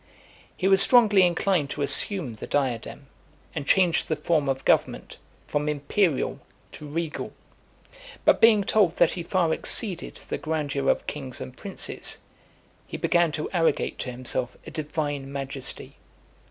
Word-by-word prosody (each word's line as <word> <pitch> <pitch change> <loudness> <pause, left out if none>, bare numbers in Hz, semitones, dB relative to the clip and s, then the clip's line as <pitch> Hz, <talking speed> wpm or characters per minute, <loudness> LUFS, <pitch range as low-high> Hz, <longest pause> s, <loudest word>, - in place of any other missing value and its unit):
He 190 - 0
was 195 0 +5
strongly 215 -6 +5
inclined 175 -3 +1
to 145 - -3
assume 140 - +1
the 110 - -9
diadem, 135 -1 -2 0.5
and 145 -3 -5
change 180 -4 +3
the 155 - -1
form 150 -2 0
of 135 0 -2
government, - - 0 0.3
from 150 +1 -1
imperial 150 +2 0 0.3
to 150 - -10
regal; 160 +1 -4 0.9
but - - +4
being 220 -3 +6
told 195 -4 +2
that 170 - +4
he 175 - -5
far 170 -1 +1
exceeded 185 -3 +2
the - - -6
grandeur 145 -3 -2
of - - +1
kings 135 -4 -6
and 130 - -8
princes, 195 +6 -3 0.7
he - - -6
began 170 -2 +2
to 155 0 -3
arrogate 165 -3 0
to 130 - -4
himself 125 0 -3
a - - -9
divine 145 -3 -4
majesty. 135 -1 -5
155 Hz, 145 wpm, -25 LUFS, 140-180 Hz, 0.9 s, being